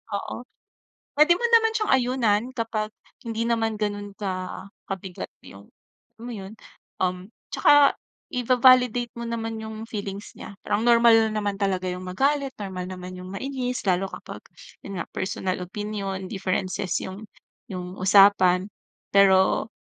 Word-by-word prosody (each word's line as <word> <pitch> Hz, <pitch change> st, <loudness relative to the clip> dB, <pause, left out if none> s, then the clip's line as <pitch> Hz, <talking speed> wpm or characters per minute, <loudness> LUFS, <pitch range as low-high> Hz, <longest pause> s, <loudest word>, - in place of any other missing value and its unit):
oo. 200 Hz, -, -4 dB, 0.8 s
Puwede 305 Hz, +4 st, +6 dB
mo 480 Hz, -, 0 dB
naman 450 Hz, -1 st, +5 dB
siyang 430 Hz, -2 st, 0 dB
ayunan 245 Hz, -5 st, +2 dB
kapag 220 Hz, -2 st, -2 dB, 0.3 s
hindi 230 Hz, -1 st, -2 dB
naman 225 Hz, -2 st, 0 dB
ganun 205 Hz, -1 st, -3 dB
ka 185 Hz, -2 st, -4 dB, 0.2 s
kabigat 190 Hz, -1 st, -6 dB
yung -, -, -13 dB, 0.5 s
alam 230 Hz, -, -13 dB
mo 245 Hz, -, -5 dB
yun? 195 Hz, +1 st, -8 dB, 0.5 s
Um, 185 Hz, -1 st, +1 dB, 0.4 s
tsaka 290 Hz, -1 st, +6 dB, 0.4 s
iva-validate 250 Hz, -1 st, +4 dB
mo 235 Hz, -, -5 dB
naman 225 Hz, -1 st, -3 dB
yung 220 Hz, 0 st, -7 dB
feelings 200 Hz, -1 st, -6 dB
niya. -, -, -9 dB
Parang 205 Hz, +2 st, 0 dB
normal 230 Hz, -2 st, +6 dB
naman 205 Hz, -2 st, -2 dB
talaga 185 Hz, -2 st, 0 dB
yung 180 Hz, +1 st, -6 dB
magalit, 275 Hz, +7 st, 0 dB
normal 190 Hz, -3 st, -5 dB
naman 185 Hz, 0 st, -7 dB
yung 185 Hz, 0 st, -9 dB
mainis 255 Hz, +3 st, -3 dB
lalo 185 Hz, +1 st, +2 dB
kapag -, -, -9 dB, 0.4 s
yun 195 Hz, -2 st, -5 dB
nga, -, -, -3 dB
personal 185 Hz, -1 st, -2 dB
opinion, 195 Hz, 0 st, -4 dB
differences 190 Hz, -2 st, -2 dB
yung 195 Hz, +3 st, -7 dB, 0.5 s
yung 180 Hz, -1 st, -6 dB
usapan, 190 Hz, -1 st, +5 dB, 0.5 s
pero 195 Hz, +2 st, +4 dB
205 Hz, 135 wpm, -25 LUFS, 190-235 Hz, 0.8 s, Puwede